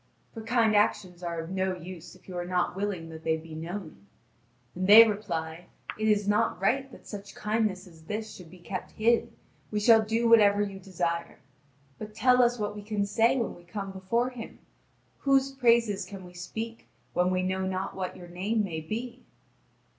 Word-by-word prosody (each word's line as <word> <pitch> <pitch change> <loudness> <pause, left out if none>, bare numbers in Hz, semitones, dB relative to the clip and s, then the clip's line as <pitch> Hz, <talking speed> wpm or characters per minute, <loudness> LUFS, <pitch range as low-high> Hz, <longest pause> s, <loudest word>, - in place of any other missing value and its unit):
For 225 - -7
kind 225 -1 +2
actions 205 -4 +1
are 170 -1 -3
of 165 +2 -6
no 190 0 0
use 175 -1 -10
if - - -21
you 185 - -8
are 175 - -2
not 180 0 -1
willing 190 -4 -3
that 160 0 -10
they 160 0 +1
be 160 0 -11
known. 160 - -7 0.7
And 185 +1 -2
they 225 +3 +10
reply: 175 -5 -4 0.3
"It 215 0 -1
is 205 -1 +2
not 205 -3 +1
right 265 +8 +1
that - - -14
such 200 -1 -9
kindness 210 -3 -1
as 165 -3 -17
this 215 +4 -4
should 180 -3 -12
be 180 - -14
kept 180 +1 -6
hid: 230 +2 +2 0.4
we 210 - -1
shall 225 +1 +6
do 225 +2 +1
whatever 205 -3 +6
you 195 -1 -5
desire. 170 -3 -3 0.6
But 215 0 -8
tell 250 +2 +5
us 240 0 +3
what 210 -1 -3
we 210 - -7
can 205 -1 -1
say 225 +5 +3
when 235 - -1
we 175 - -15
come 195 +2 -6
before 230 +7 -1
him. 235 -3 -9 0.6
Whose 275 -1 +3
praises 235 -6 +3
can 195 -3 -9
we 180 - -13
speak, 225 +6 -6 0.3
when 180 +1 +2
we 185 0 0
know 190 0 -1
not 190 0 -3
what 185 -1 -4
your 175 - -11
name 200 +6 -1
may 165 -5 -3
be?" 235 +8 -5
200 Hz, 190 wpm, -28 LUFS, 180-225 Hz, 0.7 s, they